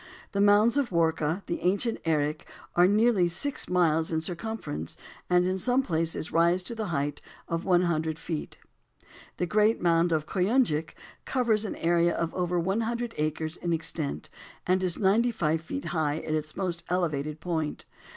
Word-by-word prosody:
The 200 Hz, -, 0 dB
mounds 205 Hz, +5 st, +5 dB
of 275 Hz, -, 0 dB
Warka, 165 Hz, +1 st, 0 dB
the 170 Hz, -, -3 dB
ancient 205 Hz, +6 st, +1 dB
Erech, 155 Hz, -1 st, 0 dB, 0.3 s
are 175 Hz, +1 st, +6 dB
nearly 210 Hz, -2 st, +3 dB
six 275 Hz, +11 st, -2 dB
miles 165 Hz, -3 st, +2 dB
in 160 Hz, -, +1 dB
circumference 170 Hz, -, -5 dB, 0.3 s
and 180 Hz, 0 st, +4 dB
in 185 Hz, +1 st, 0 dB
some 250 Hz, +5 st, +2 dB
places 165 Hz, -4 st, -1 dB
rise 170 Hz, +2 st, +3 dB
to 235 Hz, -, -4 dB
the 220 Hz, -2 st, -3 dB
height 145 Hz, -3 st, -2 dB, 0.3 s
of 165 Hz, 0 st, -3 dB
one 180 Hz, -2 st, +4 dB
hundred 160 Hz, -2 st, -1 dB
feet. 160 Hz, -2 st, -5 dB, 0.8 s
The 180 Hz, -, 0 dB
great 215 Hz, +4 st, +2 dB
mound 170 Hz, 0 st, +3 dB
of 155 Hz, -2 st, +1 dB
Koyunjik 180 Hz, -, +1 dB, 0.3 s
covers 230 Hz, -5 st, +1 dB
an 205 Hz, -, -4 dB
area 170 Hz, +1 st, +2 dB
of 165 Hz, -1 st, -2 dB
over 180 Hz, -1 st, 0 dB
one 190 Hz, +6 st, 0 dB
hundred 235 Hz, +1 st, -2 dB
acres 155 Hz, +2 st, -2 dB
in 170 Hz, -1 st, -2 dB
extent, 155 Hz, -, -3 dB, 0.3 s
and 185 Hz, +1 st, +2 dB
is 180 Hz, -3 st, +1 dB
ninety 215 Hz, +5 st, +3 dB
five 160 Hz, -8 st, 0 dB
feet 280 Hz, +12 st, -5 dB
high 155 Hz, -3 st, 0 dB
at 155 Hz, -, -4 dB
its 155 Hz, 0 st, -3 dB
most 175 Hz, -3 st, -2 dB
elevated 155 Hz, -4 st, -1 dB
point. 160 Hz, -3 st, -3 dB
175 Hz, 170 wpm, -28 LUFS, 160-205 Hz, 0.8 s, are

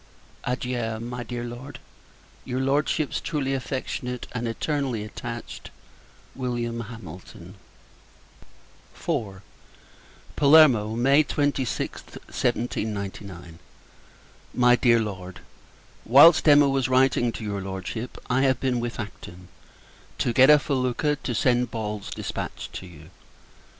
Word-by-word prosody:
Adieu, 125 Hz, -3 st, -2 dB
my 120 Hz, +1 st, -5 dB
dear 120 Hz, 0 st, -5 dB
Lord! 120 Hz, +4 st, -8 dB, 0.7 s
Your 130 Hz, 0 st, -3 dB
Lordship's 145 Hz, +2 st, 0 dB
truly 135 Hz, -4 st, -2 dB
affectionate, 130 Hz, -2 st, -4 dB
and 120 Hz, -1 st, -3 dB
eternally 130 Hz, -1 st, -2 dB
attached, 115 Hz, +2 st, -7 dB, 0.6 s
Wm. 120 Hz, -2 st, -3 dB
HAMILTON. 95 Hz, -7 st, -11 dB, 1.4 s
IV. 110 Hz, -, -3 dB, 0.9 s
Palermo, 140 Hz, -8 st, +5 dB
May 135 Hz, +5 st, +4 dB
26th, 145 Hz, -4 st, -2 dB, 0.2 s
1799. 100 Hz, -7 st, -3 dB, 1.0 s
MY 125 Hz, 0 st, +5 dB
DEAR 120 Hz, -2 st, +4 dB
LORD, 95 Hz, -4 st, -6 dB, 0.6 s
Whilst 150 Hz, +7 st, +7 dB
Emma 145 Hz, -1 st, +7 dB
was 135 Hz, -2 st, 0 dB
writing 130 Hz, -2 st, +3 dB
to -, -, -7 dB
your 100 Hz, -2 st, -3 dB
Lordship, 95 Hz, +5 st, -6 dB
I 125 Hz, +1 st, +1 dB
have 130 Hz, -2 st, +2 dB
been 130 Hz, -2 st, 0 dB
with 120 Hz, 0 st, -4 dB
Acton, 90 Hz, -4 st, -9 dB, 0.7 s
to 120 Hz, -, 0 dB
get 130 Hz, +3 st, +6 dB
a 150 Hz, -, +9 dB
felucca, 140 Hz, +1 st, 0 dB
to 120 Hz, -, -3 dB
send 125 Hz, +1 st, +2 dB
Ball's 105 Hz, -3 st, -5 dB
dispatch -, -, -5 dB
to 95 Hz, -, -7 dB
you. 80 Hz, -1 st, -14 dB
120 Hz, 110 wpm, -25 LUFS, 110-135 Hz, 1.4 s, a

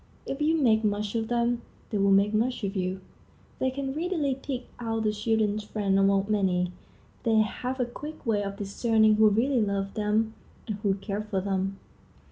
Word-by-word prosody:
If 275 Hz, -, -4 dB
you 315 Hz, +2 st, +3 dB
make 225 Hz, -7 st, +3 dB
much 205 Hz, 0 st, 0 dB
of 225 Hz, -1 st, -1 dB
them, 240 Hz, 0 st, +1 dB, 0.3 s
they 210 Hz, -, 0 dB
will 200 Hz, 0 st, +3 dB
make 200 Hz, +2 st, +4 dB
much 235 Hz, +2 st, 0 dB
of 195 Hz, +1 st, -2 dB
you. 185 Hz, 0 st, -2 dB, 0.6 s
They 260 Hz, -, +2 dB
can 270 Hz, 0 st, -3 dB
readily 320 Hz, -3 st, 0 dB
pick 260 Hz, -1 st, -5 dB, 0.2 s
out 225 Hz, -1 st, -2 dB
the 215 Hz, -, +2 dB
children's 215 Hz, -1 st, 0 dB
friend 200 Hz, -2 st, 0 dB
among 195 Hz, 0 st, +3 dB
many. 185 Hz, -4 st, +1 dB, 0.5 s
They 225 Hz, -1 st, +2 dB
have 250 Hz, +4 st, -3 dB
a 250 Hz, -, +2 dB
quick 295 Hz, +5 st, -9 dB
way 215 Hz, -3 st, +2 dB
of 200 Hz, 0 st, -5 dB
discerning 215 Hz, +1 st, +3 dB
who 215 Hz, 0 st, +6 dB
really 240 Hz, +4 st, +2 dB
love 200 Hz, -1 st, -1 dB
them 215 Hz, +1 st, +1 dB, 0.3 s
and 210 Hz, -3 st, -3 dB
who 200 Hz, -2 st, +1 dB
care 200 Hz, +1 st, -4 dB
for 210 Hz, -2 st, -2 dB
them. 195 Hz, 0 st, -1 dB
215 Hz, 185 wpm, -27 LUFS, 200-240 Hz, 0.6 s, who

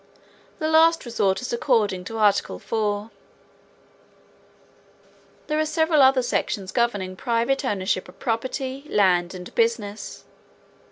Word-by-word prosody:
The 310 Hz, -, -2 dB
last 325 Hz, 0 st, +4 dB
resort 205 Hz, -2 st, 0 dB
is 245 Hz, -, -4 dB
according 215 Hz, -7 st, +1 dB
to 225 Hz, +3 st, -6 dB
article 205 Hz, -2 st, +2 dB
four. 210 Hz, -1 st, -2 dB, 2.3 s
There 305 Hz, 0 st, -1 dB
are -, -, +3 dB
several 320 Hz, -1 st, +2 dB
other 265 Hz, -1 st, +5 dB
sections 200 Hz, -5 st, -2 dB
governing 205 Hz, -6 st, -1 dB
private 235 Hz, +5 st, 0 dB
ownership 190 Hz, -6 st, -1 dB
of 180 Hz, -, -16 dB
property, 260 Hz, +3 st, -3 dB
land 180 Hz, -3 st, +2 dB
and 180 Hz, -1 st, -9 dB
business. 225 Hz, -3 st, -2 dB
230 Hz, 115 wpm, -23 LUFS, 200-265 Hz, 2.3 s, other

